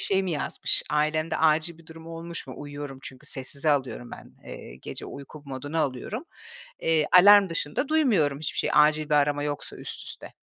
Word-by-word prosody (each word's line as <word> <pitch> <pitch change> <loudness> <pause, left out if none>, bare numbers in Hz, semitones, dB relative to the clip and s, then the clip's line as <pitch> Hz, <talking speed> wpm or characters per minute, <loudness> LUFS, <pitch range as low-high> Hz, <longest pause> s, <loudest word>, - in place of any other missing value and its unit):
şey 195 -1 +1
mi 190 - -2
yazmış? 145 - 0
Ailemde 155 +2 +1
acil 160 +1 +2
bir 165 - -18
durum 160 0 -11
olmuş 165 0 -6
mu? 130 - -8
Uyuyorum 145 -2 -7
çünkü, 130 0 -8
sessize 140 +3 -2
alıyorum 135 -4 -1
ben. - - -11
Eee, - - -9
gece - - -6
uyku 140 +1 -10
moduna 145 +4 -3
alıyorum. 150 - -3 0.6
Eee, 160 -2 +2
alarm 200 +2 +8
dışında 165 - -1
duymuyorum 210 - +2
hiçbir 155 - -3
şey - - +1
acil 150 +1 +5
bir - - +4
arama 145 0 +2
yoksa 145 -1 -4
üst - - -7
üste. - - -8
155 Hz, 180 wpm, -26 LUFS, 145-165 Hz, 0.6 s, alarm